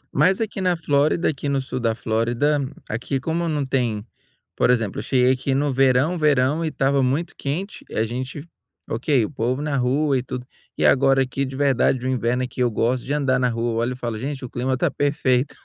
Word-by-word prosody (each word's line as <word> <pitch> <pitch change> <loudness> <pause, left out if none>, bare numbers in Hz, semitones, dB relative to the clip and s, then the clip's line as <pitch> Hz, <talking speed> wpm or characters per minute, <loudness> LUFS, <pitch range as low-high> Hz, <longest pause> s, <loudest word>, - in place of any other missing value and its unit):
Mas 190 +3 +3
aqui 210 -3 -3
na 180 -2 +1
Flórida, 150 +2 +2
aqui 145 -1 -3
no 140 -1 +1
sul 130 -1 -4
da 115 -2 0
Flórida, 120 +6 0 0.3
aqui 125 +5 -2
como 165 +4 -1
não 145 -3 -1
tem, 120 -5 -1 0.5
por - - +2
exemplo, 115 -5 +1
eu - - -4
cheguei 125 -1 +3
aqui 130 +1 0
no 140 -1 +1
verão, 135 +6 +3
verão 150 +1 +2
e - - 0
estava 135 -2 +1
muito 145 +7 0
quente 175 +9 -4
e - - -8
a 110 - +2
gente, 130 +6 -5 0.4
ok, 125 +1 +1
o - - -6
povo 125 +1 -1
na 150 -1 -2
rua 135 +3 +1
e - - -2
tudo. 125 0 -6 0.3
E - - +1
agora 135 0 +4
aqui 135 +2 -3
de 130 0 -7
verdade 130 -2 +2
o - - 0
inverno 125 0 0
aqui 125 0 -4
eu 125 - +3
gosto 120 +3 0
de - - -5
andar 135 -3 +1
na 125 -1 +2
rua, 115 0 -1
olho 125 +2 -1
e - - -8
falo: 120 -3 -4
"Gente 135 +1 -4
o - - -8
clima 130 +1 -1
tá - - +1
perfeito". 140 -2 +1
130 Hz, 220 wpm, -22 LUFS, 125-145 Hz, 0.5 s, agora